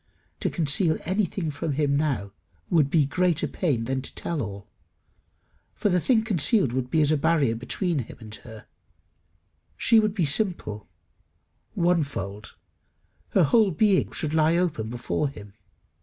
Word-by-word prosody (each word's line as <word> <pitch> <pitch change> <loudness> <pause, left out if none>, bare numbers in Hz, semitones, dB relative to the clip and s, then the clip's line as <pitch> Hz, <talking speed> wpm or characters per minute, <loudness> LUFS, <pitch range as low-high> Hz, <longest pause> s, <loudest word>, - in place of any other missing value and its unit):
To - - 0
conceal 160 +1 +1
anything 185 -3 -1
from 145 +1 -3
him 140 0 +1
now 140 -10 -1 0.4
would 155 -5 +3
be 150 -1 +3
greater 175 +2 +1
pain 140 -11 -1
than 130 +2 -2
to - - -8
tell 165 -4 -3
all, 100 -3 -7 1.1
for 210 - 0
the 180 -1 +2
thing 220 +4 +2
concealed 195 - +2
would 130 -1 -2
be 155 - +2
as 150 - +2
a 155 - +3
barrier 150 -5 +2
between 155 - -2
him 120 - -7
and 110 -2 -11
her; 110 -2 -12 1.1
she 230 -1 +4
would 215 -1 0
be 180 -6 +1
simple 140 - -2 0.9
one 175 -1 +2
fold; 105 -7 -6 0.8
her 190 - +5
whole 210 +8 +4
being 190 +3 +2
should 155 -1 -2
lie 160 +1 +3
open 155 -12 -1
before 120 +4 -2
him. 105 -7 -12
155 Hz, 155 wpm, -25 LUFS, 130-180 Hz, 1.1 s, her